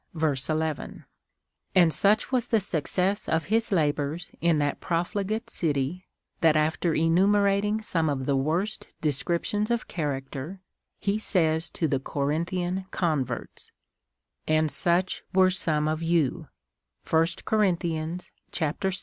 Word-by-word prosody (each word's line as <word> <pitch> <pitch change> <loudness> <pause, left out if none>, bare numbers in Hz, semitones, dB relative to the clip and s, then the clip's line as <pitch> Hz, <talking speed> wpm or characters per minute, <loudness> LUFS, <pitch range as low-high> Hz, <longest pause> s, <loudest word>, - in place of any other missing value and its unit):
11 155 0 -1 0.3
;) - - -48
and 170 -4 +6
such 210 +5 +2
was 250 -2 +1
the 225 - +3
success 185 +2 -1
of 160 -1 +1
his 225 0 +2
labours 150 -1 0
in 170 -2 +3
that 145 -1 0
profligate 200 +6 -1
city, 155 -1 -2 0.3
that 160 -2 +4
after 160 +2 +1
enumerating 200 +5 +3
some 165 -6 0
of 135 -2 -2
the 140 - +1
worst 165 +10 -1
descriptions 170 - -1
of 235 -1 -1
character, 145 +2 -4 0.4
he 205 +1 -1
says 165 -6 +1
to 160 - -1
the 135 -2 0
Corinthian 170 +7 -2
converts, 140 -9 -2 0.3
— - - -58
" 65 +2 -49
And 155 -1 +1
such 180 +2 +1
were 185 -1 +6
some 155 -5 0
of 155 +1 -1
you" 165 -1 +1 0.6
(1 160 0 +4 0.2
Cor, 210 -5 +3
vi. 165 -1 -2
165 Hz, 130 wpm, -27 LUFS, 150-190 Hz, 0.6 s, and